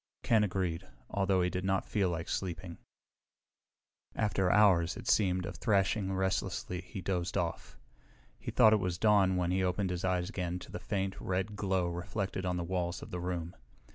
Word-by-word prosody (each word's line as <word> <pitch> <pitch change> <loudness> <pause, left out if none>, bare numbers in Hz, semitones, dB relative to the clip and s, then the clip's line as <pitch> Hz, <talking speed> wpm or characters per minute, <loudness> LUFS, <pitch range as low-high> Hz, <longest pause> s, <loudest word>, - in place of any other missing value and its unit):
Ken 110 -2 +4
agreed, 90 -3 -2 0.2
although 95 -2 +2
he 90 - +1
did 90 - -2
not 95 0 +1
feel 100 -4 +1
like 85 -1 -3
sleeping. 85 -2 -4 1.4
After 95 -4 +1
hours, 90 -5 +4
it 120 - -9
seemed, 90 -3 +2
of - - -6
thrashing 100 -2 +1
restlessly 95 -1 -1
he 95 +2 -8
dozed 90 -1 -1
off. - - -3 0.6
He - - -6
thought 110 - +6
it - - +5
was 90 -3 -2
dawn 100 -2 +4
when 90 -1 0
he 95 +1 +1
opened 90 +1 0
his 90 0 -3
eyes 90 -1 +1
again 90 -4 -3
to 90 - -10
the - - -5
faint, 95 -1 -3
red 95 +3 -2
glow 95 -3 0
reflected 90 +2 -3
on 90 0 0
the 85 - -2
walls 85 0 -2
of - - -10
the 90 - -3
room. 90 -1 -3
95 Hz, 180 wpm, -32 LUFS, 90-95 Hz, 1.4 s, thought